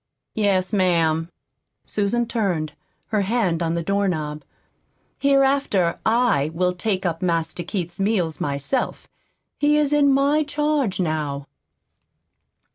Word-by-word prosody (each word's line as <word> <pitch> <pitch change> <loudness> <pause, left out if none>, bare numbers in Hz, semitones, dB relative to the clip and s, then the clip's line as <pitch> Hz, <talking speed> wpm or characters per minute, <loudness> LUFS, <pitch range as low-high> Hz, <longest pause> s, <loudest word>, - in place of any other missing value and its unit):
"Yes, 195 -3 +1
ma'am." 165 -4 +2 0.6
Susan 215 +4 0
turned, 180 -10 -1 0.4
her 215 -2 +1
hand 195 -5 0
on 165 0 0
the 170 - -2
doorknob. 160 -6 -1 0.8
"Hereafter 275 -10 +2
I 225 - +2
will 180 +1 +1
take 190 +1 -2
up 165 -2 -1
Master 165 -1 -1
Keith's 175 0 -4
meals 195 -6 0
myself. 145 - -2 0.5
He 295 +1 +3
is 295 -1 +2
in 285 -1 +4
my 280 +3 +3
charge 295 -7 0
now." 150 -5 -2
190 Hz, 115 wpm, -22 LUFS, 165-240 Hz, 0.8 s, in